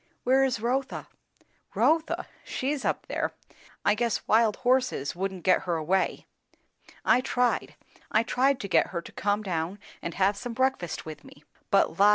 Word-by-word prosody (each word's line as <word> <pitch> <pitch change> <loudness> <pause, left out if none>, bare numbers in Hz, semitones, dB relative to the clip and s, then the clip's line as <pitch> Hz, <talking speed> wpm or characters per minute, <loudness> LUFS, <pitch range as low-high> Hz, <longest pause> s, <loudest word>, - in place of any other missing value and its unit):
"Where 265 +2 +4
is 260 -5 +1
Rotha?" 260 +4 -1 0.7
"Rotha! 320 0 +2 0.2
she's 275 +1 -2
up - - -1
there. - - -2 0.5
I 205 - +5
guess 230 +1 -1
wild 220 -1 +4
horses 255 - +1
wouldn't 190 0 -3
get 185 - +4
her 175 -2 0
away. 170 +4 0 0.8
I 250 - +5
tried; 250 -1 0 0.3
I 220 - +3
tried 260 +3 +2
to 200 - -4
get 185 - +3
her 170 -3 -4
to - - -11
come 205 +1 0
down 175 0 -2 0.2
and 170 - -5
have 195 +1 +3
some 240 +3 -5
breakfast 260 -9 -1
with 155 -2 -8
me; 145 - -16 0.3
but 195 - +2
la! 205 +1 +7
215 Hz, 165 wpm, -27 LUFS, 185-255 Hz, 0.8 s, la